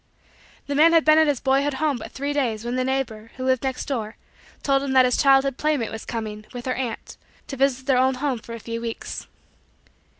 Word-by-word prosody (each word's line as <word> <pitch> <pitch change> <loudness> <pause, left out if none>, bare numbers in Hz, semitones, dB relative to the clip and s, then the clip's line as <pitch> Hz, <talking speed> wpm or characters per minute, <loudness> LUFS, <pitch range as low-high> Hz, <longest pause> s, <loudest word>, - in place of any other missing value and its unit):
The 285 - -3
man 320 +4 +5
had 330 -1 +4
been 310 0 +6
at 315 - +4
his 285 -4 +1
boyhood 275 +1 +1
home 295 -1 0
but - - -8
three 285 +2 -3
days 235 -6 -1
when 240 +1 -2
the 255 - +1
neighbor, 250 -4 -2
who 255 - -4
lived 260 -1 +2
next 265 -1 -3
door, 225 -5 -3 0.5
told 275 -1 +2
him 275 -1 -2
that 260 -1 +6
his 250 - +2
childhood 270 -1 +4
playmate 300 -7 0
was 220 - -7
coming, 215 -2 -5
with 245 -1 -7
her 255 - 0
aunt, 250 -3 -5 0.3
to 275 - -6
visit 265 -1 +1
their 265 -2 +3
old 260 0 +2
home 270 -3 -1
for 230 +1 -9
a - - -8
few 230 +1 -5
weeks. 230 -1 -6
260 Hz, 225 wpm, -23 LUFS, 235-275 Hz, 0.5 s, been